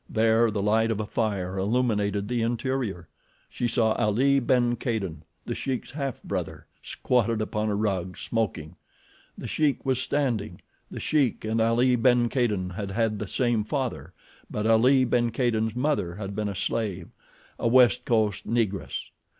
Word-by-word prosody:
There 115 +1 +3
the 105 -2 -2
light 110 +2 +2
of 110 -2 -1
a 110 - -2
fire 100 -4 -2
illuminated 105 -2 0
the 120 0 -1
interior. 115 - -2 0.4
She 120 - -1
saw 115 -2 +2
Ali 130 +8 +2
ben 120 -1 +2
Kadin, 105 - -3 0.2
The 120 - -3
Sheik's 130 0 -4
half 140 -2 -4
brother, - - -4 0.2
squatted 115 -3 0
upon 110 0 -1
a 105 - 0
rug, 95 -4 -2
smoking. 100 -9 -3 0.6
The - - -6
Sheik 150 -3 0
was 130 -2 +1
standing. 120 -9 -1 0.3
The - - -7
Sheik 140 -8 0
and 110 +1 0
Ali 120 +3 +3
ben 120 0 +3
Kadin 105 -8 0
had 100 +2 -5
had 110 +1 0
the 105 - -4
same 120 -1 0
father, 130 +2 -3 0.4
but 105 - -3
Ali 125 +4 +5
ben 120 -1 +1
Kadin's 110 -2 0
mother 125 - 0
had 100 -1 -6
been 105 0 -1
a 100 - -5
slave—a 95 +2 -4
West 120 -3 +5
Coast 110 -4 0
Negress. 110 -5 -2
115 Hz, 155 wpm, -26 LUFS, 105-125 Hz, 0.6 s, Ali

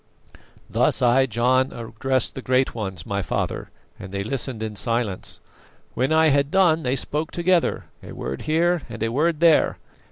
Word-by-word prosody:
"Thus - - +1
I, 130 +2 +4
John, 125 +3 +2
addressed 120 +2 -2
the 130 - -6
great 130 +1 +1
ones, 95 -8 -5
my 100 0 -2
father, - - -3 0.3
and 95 - -9
they 100 0 -3
listened 115 0 -3
in 110 -1 -4
silence. 115 -3 -2 0.5
When 130 +4 0
I 160 0 +5
had 140 0 +2
done 170 -3 +3
they 130 -2 0
spoke 150 +4 -2
together, 175 0 +1 0.2
a - - -10
word 65 +1 -5
here 170 +2 +2
and - - -5
a 115 - 0
word 155 +5 +1
there. 165 -2 +4
130 Hz, 165 wpm, -23 LUFS, 115-155 Hz, 0.5 s, I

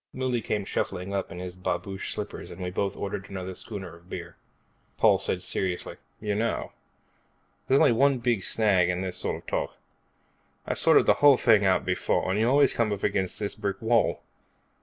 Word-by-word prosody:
Mouley 130 -2 -1
came 105 -2 -2
shuffling 95 0 -3
up 100 -1 -2
in 90 - -8
his 90 0 -6
babouche 95 +1 -3
slippers - - -6
and 85 - -10
we 90 -1 -4
both 100 +1 -2
ordered 100 -1 -5
another 95 -1 -5
schooner 95 -4 -8
of 85 +2 -20
beer. 90 -1 -7 0.6
Paul - - +4
said 90 -1 -2
seriously, 90 -1 -3 0.2
"You 105 -1 -2
know, 115 +3 -1 1.0
there's 135 +1 +4
only - - +5
one 135 +3 +3
big 120 -4 0
snag 95 -3 +3
in 90 0 -1
this 95 -1 -3
sort - - -2
of - - -11
talk. - - -2 0.9
I've - - -2
sorted - - +5
the - - +6
whole 145 -2 +7
thing 110 -5 +4
out 95 -1 +2
before, - - 0
and 100 - 0
you 115 +2 +3
always 140 +1 +4
come 115 -2 0
up 100 -1 -4
against 95 -2 0
this 100 -1 -2
brick 105 +1 -3
wall. 115 0 +1
100 Hz, 190 wpm, -27 LUFS, 90-115 Hz, 1.0 s, whole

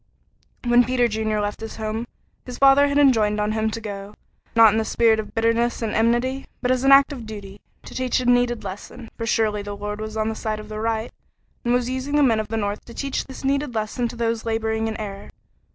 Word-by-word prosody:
When 240 0 +5
Peter 245 0 +2
Junior 215 -1 -1
left 205 0 -2
his 225 - -6
home, 220 +2 -4 0.4
his 250 -1 -8
father 275 +1 +6
had 285 0 0
enjoined 220 -7 +4
on 210 0 0
him 220 0 0
to 225 - -5
go, 205 -1 -7 0.4
not 225 -2 +8
in 220 - +1
the - - +1
spirit 225 0 +3
of 215 - -6
bitterness 230 +1 +1
and 220 - -2
enmity, 240 +4 +1
but 250 -1 0
as 255 0 +1
an 270 - +5
act 275 +1 +7
of 240 -5 -8
duty, 200 -2 -9 0.2
to - - -10
teach 255 -1 0
a 255 - -3
needed 245 -1 +2
lesson; 205 +5 -8
for 230 - -4
surely 215 -2 +1
the 205 0 -6
Lord 210 +1 -5
was 215 0 -5
on 215 0 0
the 220 - -1
side 215 -1 -3
of 215 - -10
the 215 0 -5
right, 225 0 -2 0.5
and 240 - 0
was 245 0 +2
using 260 +3 -2
the 295 - +5
men 230 -5 +3
of 215 - -3
the 225 +1 -3
North 205 -1 -2
to 235 - -12
teach 275 -1 -2
this 265 - -10
needed 275 -2 0
lesson 220 +3 -1
to 235 - -8
those 230 -1 -1
laboring 225 0 -1
in 220 - -4
error. 200 -2 -7
225 Hz, 235 wpm, -23 LUFS, 215-245 Hz, 0.5 s, not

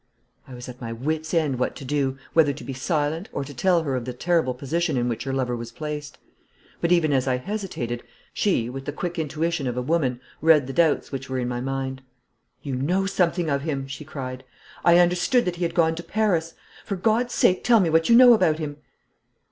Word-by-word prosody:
I 130 - -10
was 125 0 -9
at 125 +1 -10
my 115 -1 -5
wit's 155 +7 -3
ends 150 -7 +1
what 125 - -1
to 135 - -9
do, 135 -1 -1 0.2
whether 155 -3 +4
to 145 - -10
be 135 - -5
silent, 155 +6 -1
or 140 - -3
to 145 +1 -9
tell 175 +5 +2
her 140 -4 -1
of 125 -2 -3
the 125 - -4
terrible 160 -1 +1
position 160 +4 -1
in 120 0 0
which 120 +1 -3
her 135 - -2
lover 130 -2 -1
was 120 0 -7
placed; 150 -1 -6 0.6
but, 170 - +1
even 165 -4 +3
as 130 0 +1
I 130 -1 +2
hesitated, 125 - -4 0.3
she, 180 - +1
with 135 +2 -7
the 145 - -4
quick 175 +2 -4
intuition 160 -1 -1
of 125 0 -3
a - - 0
woman, 135 -5 0 0.2
read 155 -3 +5
the 135 - -6
doubts 165 -2 +2
which 135 -1 -5
were 130 - -2
in 125 -1 -1
my 120 0 -3
mind. 135 0 -3 0.6
'You 135 -2 -3
know 180 +9 +1
something 180 -3 +1
of 140 -2 0
him,' 140 -3 -3
she 135 +2 -7
cried. 130 -4 -6 0.4
'I 170 0 +6
understood 180 +8 +3
that 180 -1 -2
he 175 - -2
had 170 0 -3
gone 160 -2 +3
to 165 - -6
Paris. 180 -7 0 0.3
For 200 - -3
God's 225 +5 +1
sake 185 - +3
tell 235 -2 +5
me 175 -5 +2
what 165 +4 +3
you 235 - +7
know 245 0 +9
about 160 -8 +3
him!' 150 -2 -5
150 Hz, 225 wpm, -24 LUFS, 130-170 Hz, 0.6 s, know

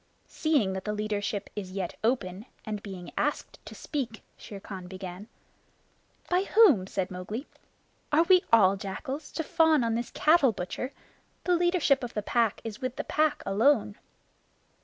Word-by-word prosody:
"Seeing 280 -12 +1
that 190 0 -4
the 210 - -1
leadership 210 -1 -2
is 190 -3 -6
yet 190 -3 -3
open, 220 -3 -1 0.2
and 210 -2 -4
being 190 -4 -8
asked - - -2
to - - -9
speak 245 -7 -4
" - - -39
Shere 200 - -10
Khan 190 -2 -8
began. 185 +1 -8 1.0
"By 360 +2 +1
whom?" 345 - +5
said 190 -1 -3
Mowgli. 200 +9 -5 0.7
"Are 305 +3 +5
we 365 +1 +5
all 200 -4 +6
jackals, 260 +9 -6
to 325 - -2
fawn 320 -3 +3
on 230 -1 0
this 235 +1 -2
cattle 300 -6 +4
butcher? 190 +8 -4 0.5
The 360 - +3
leadership 345 -6 +2
of 240 - -6
the 210 - -1
Pack 230 -1 +1
is 225 +2 -7
with 255 -1 -3
the - - -3
Pack 305 -1 +1
alone." 210 +1 +2
225 Hz, 160 wpm, -28 LUFS, 195-295 Hz, 1.0 s, all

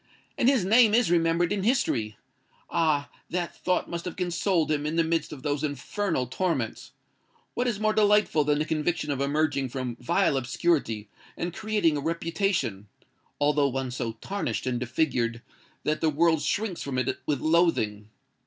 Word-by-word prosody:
And 245 - +3
his 260 -9 +2
name 220 +1 +6
is 235 -7 +3
remembered 170 +2 +2
in 205 - -1
history! 155 - 0 0.5
Ah! 155 -3 +1 0.2
that 175 -1 -3
thought 180 0 +1
must 170 0 -5
have 180 - -5
consoled 175 -2 0
him 145 -1 0
in 155 - -2
the 165 - +3
midst 165 -1 -1
of 140 -4 -9
those 145 0 -1
infernal 150 - -2
torments. 130 - -2 0.6
What 245 +1 -1
is 225 -5 -1
more 215 0 +2
delightful 210 -7 +3
than 145 0 +2
the 155 - 0
conviction 155 -1 -1
of 140 -1 -2
emerging 140 -1 0
from 125 -2 -4
vile 125 +3 +1
obscurity, 125 -4 0 0.3
and 175 0 -3
creating 205 -7 +1
a - - -3
reputation—although 150 - -1
one 130 -1 -3
so 120 -2 -3
tarnished 195 - -3
and 125 -2 -1
disfigured 120 -2 -1 0.4
that 155 0 -1
the 160 - +3
world 160 +1 +2
shrinks 205 -1 -1
from 135 -2 -3
it 130 - -1
with 145 -3 +1
loathing? 155 -11 +1
155 Hz, 165 wpm, -27 LUFS, 135-180 Hz, 0.6 s, name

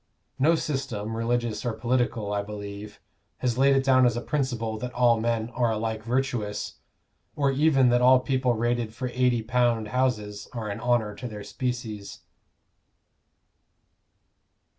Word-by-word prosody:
No 155 +5 +4
system, 135 -8 -3
religious 115 -1 -1
or 120 -3 -1
political, 115 -2 -1
I 100 - 0
believe, 100 0 -8 0.4
has 125 -1 -1
laid 135 0 +5
it 135 - +2
down 130 -1 +5
as 120 -1 0
a - - -2
principle 120 -6 -2
that 125 +1 -4
all 120 -2 +4
men 115 0 -1
are 120 -1 +1
alike 110 0 -2
virtuous, 120 -3 -2 0.6
or 140 -2 +2
even 135 -2 +4
that 120 0 +3
all 130 +1 +7
the 125 - -4
people 130 -2 +1
rated 120 -1 -1
for 125 0 -3
£80 120 -2 +1
houses 105 -5 -1
are 110 -3 -4
an 100 - -5
honor 120 -3 +1
to 125 - -7
their 105 -3 -7
species. 110 -3 -5
120 Hz, 145 wpm, -26 LUFS, 110-130 Hz, 0.6 s, all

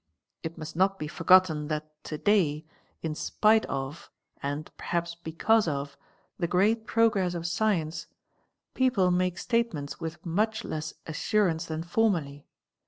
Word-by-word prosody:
It 160 +1 -6
must 155 0 -7
not 195 +2 +2
De 155 - -4
forgotten 165 -2 +4
that 155 0 -5
to 155 - -4
day, 160 -6 +2 0.4
in 160 -2 -1
spite 215 +7 +2
of, 135 +5 -5 0.3
and 145 +2 -4
perhaps 170 0 -2
because 170 +6 +1
of, 140 -2 -3 0.4
the 170 - +1
great 215 +6 +2
progress 205 -6 +2
of 170 -1 -4
science, 170 -3 0 0.7
people 235 -9 +3
make 180 0 +1
statements 230 - -1
with 165 +1 -6
much 215 +6 0
less 155 0 -4
assurance 170 0 +1
than 160 0 -3
formerly. 170 -7 0
170 Hz, 135 wpm, -28 LUFS, 155-205 Hz, 0.7 s, forgotten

